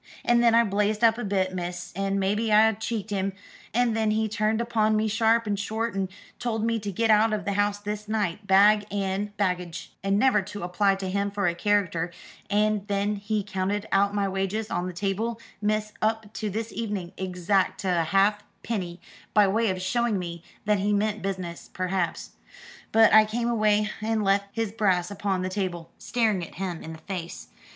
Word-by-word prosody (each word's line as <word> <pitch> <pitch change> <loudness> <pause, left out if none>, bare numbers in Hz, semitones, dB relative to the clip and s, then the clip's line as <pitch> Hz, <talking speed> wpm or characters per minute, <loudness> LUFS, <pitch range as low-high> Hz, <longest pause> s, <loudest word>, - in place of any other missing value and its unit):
And 240 0 +4
then 235 -1 +5
I 235 - +6
blazed 210 +1 0
up 225 0 +5
a - - -3
bit, 190 -2 0
miss, 175 -1 -5
and 195 +1 0
maybe 210 +3 0
I 220 +1 +6
cheeked 220 0 -4
him: 195 -1 -1 0.4
and 240 -1 +2
then 220 -1 +1
he 220 +1 +1
turned 215 +1 0
upon 220 -2 +1
me 215 +1 +1
sharp 225 +2 +2
and 205 -2 -1
short 220 +2 -2
and 195 -1 -2 0.3
told 225 -2 -1
me 230 0 +1
to 205 -1 -4
get 225 +4 +2
out 215 +1 +4
of 210 -4 -2
the 200 - 0
house 205 0 +1
this 210 +1 -5
night, 210 -2 -2
bag 205 +2 +5
and 200 +1 -2
baggage, 180 -4 -2
and 195 0 +2
never 240 -3 +4
to 205 +1 -7
apply 195 +3 +2
to 195 -1 -5
him 200 +1 0
for 200 -1 -2
a 170 - +2
character; 180 -2 0 0.4
and 210 0 +1
then 205 0 0
he 205 +1 -2
counted 195 +2 -2
out 200 +1 +3
my 200 -1 +1
wages 195 +3 -2
on 175 - -1
the - - -4
table, 205 +5 -2 0.2
miss, 215 0 0
up 220 -1 -1
to 215 - -3
this 220 +3 -4
evening, 205 -6 -4
exact 185 +1 0
to 180 -3 +1
a - - -1
halfpenny, 195 -1 -1 0.4
by 210 -2 +6
way 220 +3 +2
of 185 -1 -2
showing 230 +3 0
me 170 -2 -5 0.2
that 210 -1 +2
he 205 +2 +1
meant 210 +1 0
business, 185 -3 -5
perhaps. 185 -2 -2 0.6
But 225 0 +6
I 215 0 +9
came 230 +2 -2
away 215 -2 +2
and 220 0 0
left 200 0 +2
his 225 -2 -2
brass 190 -4 +1
upon 195 -2 -1
the - - -1
table, 180 -4 -3
staring 220 -6 0
at - - -10
him 180 -3 -4
in 160 - -7
the - - -9
face. 180 -3 -6
205 Hz, 195 wpm, -26 LUFS, 190-215 Hz, 0.6 s, I